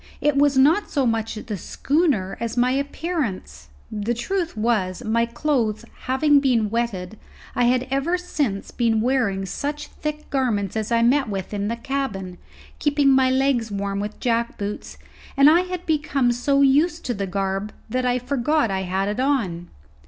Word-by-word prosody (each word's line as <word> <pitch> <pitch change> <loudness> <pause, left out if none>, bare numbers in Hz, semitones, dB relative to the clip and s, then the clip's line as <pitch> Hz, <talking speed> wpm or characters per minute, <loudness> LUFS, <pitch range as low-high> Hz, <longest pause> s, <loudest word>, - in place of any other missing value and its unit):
It 295 -1 +2
was 280 -1 +3
not 310 +10 +4
so 275 -3 +1
much 225 -1 -1
the 215 0 -5
schooner 270 - 0
as 230 0 -4
my 250 +1 +3
appearance. 275 - -3 0.2
The 215 +3 -2
truth 345 - -2
was, 210 -5 0
my 230 +2 +1
clothes 235 -4 -1 0.2
having 285 +3 +4
been 235 -6 +1
wetted, 220 -4 -3 0.3
I 245 - +2
had 250 +1 +2
ever 285 +7 +1
since 285 - -2
been 225 -2 +1
wearing 230 -6 +1
such 290 +9 -4
thick 300 0 -5
garments 225 -8 0
as 220 +1 -2
I 230 0 +3
met 260 +1 +3
with 195 0 -4
in 205 0 -2
the 230 - -1
cabin, 235 -9 -4 0.4
keeping 290 -2 +3
my 265 -1 +4
legs 260 -3 +1
warm 200 -1 -3
with 205 +1 -5
jackboots, 230 -4 -2 0.4
and 275 +1 +7
I 320 +3 +7
had 365 -1 -5
become 285 -5 +1
so 275 +4 +2
used 305 +5 +3
to 245 - -1
the 200 -2 -3
garb 195 +2 -2 0.2
that 255 +3 -1
I 250 0 +2
forgot 260 0 0
I 190 0 -1
had 190 +1 -1
it 210 +3 -2
on. 215 -11 0
240 Hz, 165 wpm, -23 LUFS, 210-280 Hz, 0.4 s, and